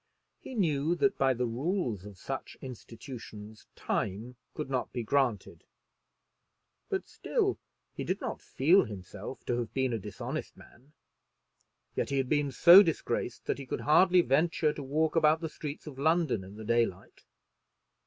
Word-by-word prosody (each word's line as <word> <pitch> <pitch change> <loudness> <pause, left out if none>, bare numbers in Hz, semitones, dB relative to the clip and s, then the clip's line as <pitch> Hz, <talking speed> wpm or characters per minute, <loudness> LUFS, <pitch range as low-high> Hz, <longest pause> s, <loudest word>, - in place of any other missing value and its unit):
He 260 - -9
knew 160 -5 +1
that 200 +3 +1
by 135 -1 +3
the 125 +1 -1
rules 120 - -2
of 105 -2 -11
such - - -6
institutions 115 -3 -10
time 105 +5 -3 0.2
could 150 - -4
not 130 -2 -2
be 120 -2 -3
granted; 125 -3 0 1.3
but - - -2
still - - -1 0.3
he - - -5
did - - -2
not - - -5
feel 170 +9 +3
himself 100 +2 -8
to 120 0 0
have 120 - -5
been 130 -2 +1
a 115 - -1
dishonest 100 -1 -6
man. 135 +5 -18 1.0
Yet - - -1
he 140 - -1
had 130 -2 0
been 145 -2 +1
so 175 +8 +9
disgraced 135 - -2
that - - -1
he 135 - -8
could - - -3
hardly 180 +4 +5
venture 155 +1 +2
to - - -7
walk 150 +4 0
about 155 -1 +4
the 160 -1 -4
streets 150 -1 -7
of 140 -4 -9
London 160 - +2
in 95 +2 -11
the 110 0 -9
daylight. 115 -5 -1
135 Hz, 160 wpm, -30 LUFS, 115-155 Hz, 1.3 s, so